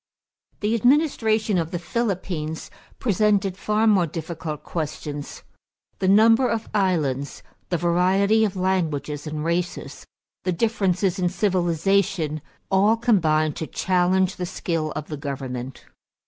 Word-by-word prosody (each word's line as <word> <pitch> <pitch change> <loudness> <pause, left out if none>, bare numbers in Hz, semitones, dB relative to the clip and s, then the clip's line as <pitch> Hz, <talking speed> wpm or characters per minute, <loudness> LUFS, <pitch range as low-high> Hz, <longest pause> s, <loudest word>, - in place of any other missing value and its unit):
= - - -45
The 210 +2 +1
administration 225 - +2
of 165 -1 -2
the 175 - -3
Philippines 175 -6 -3 0.3
presented 205 -3 +1
far 215 +3 0
more 195 -6 +4
difficult 160 -1 -6
questions. 150 -2 -5 0.6
The 190 - 0
number 225 +5 +5
of 225 -1 -2
islands, 155 -9 0 0.3
the 175 - +1
variety 185 +6 +3
of 205 -3 0
languages 160 -6 -1
and 150 0 -4
races, 170 +1 -3 0.4
the 185 - 0
differences 195 -2 0
in 180 -1 +1
civilization 180 -3 0 0.3
all 205 +4 +4
combined 155 - +2
to 160 - -4
challenge 185 +1 +1
the 180 -2 -3
skill 165 -4 -2
of 150 - -5
the 150 - -6
government. 130 -3 -6
180 Hz, 125 wpm, -23 LUFS, 155-205 Hz, 0.6 s, number